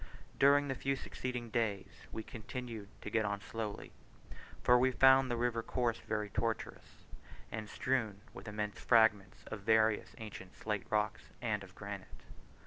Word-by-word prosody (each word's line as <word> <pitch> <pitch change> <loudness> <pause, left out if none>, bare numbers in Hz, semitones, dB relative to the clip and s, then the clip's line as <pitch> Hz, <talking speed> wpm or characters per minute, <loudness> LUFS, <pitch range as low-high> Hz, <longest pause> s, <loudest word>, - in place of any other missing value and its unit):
During 145 +1 +6
the 135 - 0
few 135 +1 -1
succeeding 125 -3 -5
days 100 -8 -2
we 110 - -4
continued 115 -2 -6 0.2
to - - -5
get 110 -1 +2
on 100 -1 -1
slowly, 105 0 -5 0.7
for 125 0 +6
we 130 +1 +4
found 130 +1 +6
the 120 - 0
river 120 -1 +1
course 120 0 0
very 105 -1 -3
tortuous, 115 -1 -3 0.5
and 110 -1 -5
strewed 110 -6 0
with - - -10
immense 105 0 -3
fragments 110 -2 +4
of 110 - -3
various 110 0 +3
ancient 105 -4 -9
slate 105 -2 -2
rocks, 105 -1 0
and 105 -4 -1
of 95 -1 -14
granite. 100 -2 -8
110 Hz, 150 wpm, -35 LUFS, 105-125 Hz, 0.7 s, During